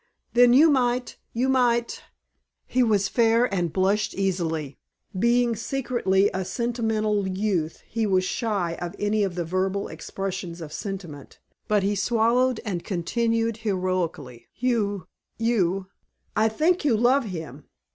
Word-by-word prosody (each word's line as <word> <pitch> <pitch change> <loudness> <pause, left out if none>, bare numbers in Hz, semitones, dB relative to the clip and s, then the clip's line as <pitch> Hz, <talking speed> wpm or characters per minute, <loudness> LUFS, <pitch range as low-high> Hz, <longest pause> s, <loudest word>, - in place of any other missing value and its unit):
"Then 245 0 +6
you 305 +5 +7
might 250 -2 0
you 245 +3 0
might 240 -3 +1 0.3
" - - -48 0.3
He 255 - +1
was 210 -5 +3
fair 230 +1 +3
and 175 -4 0
blushed 195 +4 +1
easily. 165 -7 -2 0.4
Being 235 +1 +3
secretly 230 -5 +1
a 190 - -1
sentimental 215 -1 -1
youth 185 -4 -2
he 225 -2 -1
was 185 -2 +2
shy 195 -7 -2
of 175 -1 -5
any 210 +1 0
of 190 -3 -2
the 175 -2 -2
verbal 190 +3 -1
expressions 190 -3 -5
of 155 -2 -8
sentiment; 180 -8 -7 0.3
but 210 -2 +2
he 200 +1 +1
swallowed 230 +5 +2
and 180 -5 -3
continued 225 +5 -1
heroically. 185 - -3
"You 210 -7 -1 0.3
you 195 -5 +1 0.5
I 220 +1 +3
think 320 +11 +1
you 260 -7 +3
love 250 +3 +3
him. 160 - -7
205 Hz, 135 wpm, -25 LUFS, 185-235 Hz, 0.5 s, you